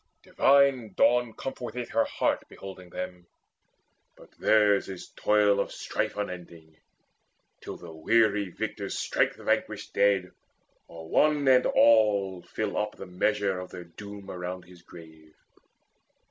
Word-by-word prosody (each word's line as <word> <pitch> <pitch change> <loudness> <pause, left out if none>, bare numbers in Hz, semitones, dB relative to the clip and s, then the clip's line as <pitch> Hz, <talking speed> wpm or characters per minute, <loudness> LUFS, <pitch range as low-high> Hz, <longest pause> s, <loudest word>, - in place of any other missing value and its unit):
Divine 135 -6 +3
Dawn 120 +2 +3
comforteth 125 -2 -6
her 115 0 +2
heart - - -1
Beholding 95 -2 -10
them: 90 -1 -7 0.9
but - - -17
theirs 105 -2 +3
is 95 -2 -8
toil 105 -1 +3
of - - -1
strife - - -3
Unending, 85 -5 -7 0.9
till - - -7
the 85 - -11
weary 105 +4 +2
victors 100 +1 -4
strike - - 0
The - - -14
vanquished - - -1
dead, 100 -3 +2 0.6
or 80 -1 -11
one 150 - +2
and 130 -1 +5
all 100 -5 +3
fill 105 +2 -4
up 105 0 -3
The - - -9
measure 95 +1 0
of 90 - -8
their 90 - -9
doom 100 +3 -10
around 90 0 -6
his 90 -1 -17
grave. 80 -2 -15
100 Hz, 130 wpm, -27 LUFS, 90-110 Hz, 0.9 s, and